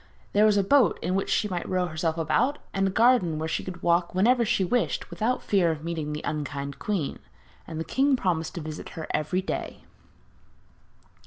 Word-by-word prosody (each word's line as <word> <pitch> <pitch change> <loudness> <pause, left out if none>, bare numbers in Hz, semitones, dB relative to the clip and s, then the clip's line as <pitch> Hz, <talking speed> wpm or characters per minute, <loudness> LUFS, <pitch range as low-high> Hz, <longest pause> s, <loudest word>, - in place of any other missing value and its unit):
There 210 +1 +5
was 210 -1 +3
a 200 - +3
boat 270 +6 +4
in 180 - 0
which 195 +1 -1
she 210 - +2
might 180 -3 -4
row 185 -1 +1
herself 160 -1 -2
about, 250 - +1 0.2
and 195 0 +1
a - - +1
garden 210 -6 +3
where 160 +1 -2
she - - -2
could 180 -2 -8
walk 170 +1 +2
whenever 235 +6 +4
she 200 -3 +1
wished 245 +7 -1
without 245 +3 -1
fear 190 -4 +2
of 155 -2 -3
meeting 160 -3 -3
the 150 +1 -5
unkind 140 -2 -4
queen; 190 -9 -2 0.5
and 160 -1 -5
the - - -1
king 275 +1 +2
promised 175 -9 -1
to 170 - -4
visit 155 0 -7
her 160 - -4
every 165 +5 0
day. - - -5
180 Hz, 195 wpm, -26 LUFS, 160-210 Hz, 0.5 s, There